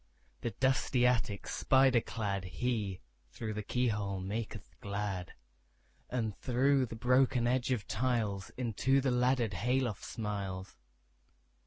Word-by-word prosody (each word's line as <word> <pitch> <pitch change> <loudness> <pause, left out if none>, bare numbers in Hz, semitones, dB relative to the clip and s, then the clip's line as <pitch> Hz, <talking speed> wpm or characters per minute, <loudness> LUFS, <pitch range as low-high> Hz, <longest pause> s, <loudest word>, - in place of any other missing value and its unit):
The 120 - -1
dusty 130 +2 +2
attic 115 -5 +1
spider 130 -2 +4
cladHe, 100 0 -2 0.3
through 110 -2 -5
the 105 - -3
keyhole, 105 -4 0
maketh 105 +2 -5
glad; 100 -3 -3 0.8
And 110 -4 -1
through 130 +1 +3
the 115 - -7
broken 125 +1 +3
edge 125 +1 +1
of 115 -6 -1
tiles, 110 -4 0
Into 130 +2 +2
the 135 -1 +1
laddered 125 -3 +2
hay 120 +8 +1
loft 120 -7 -2
smiles. 100 -3 -4
115 Hz, 120 wpm, -33 LUFS, 100-125 Hz, 0.8 s, spider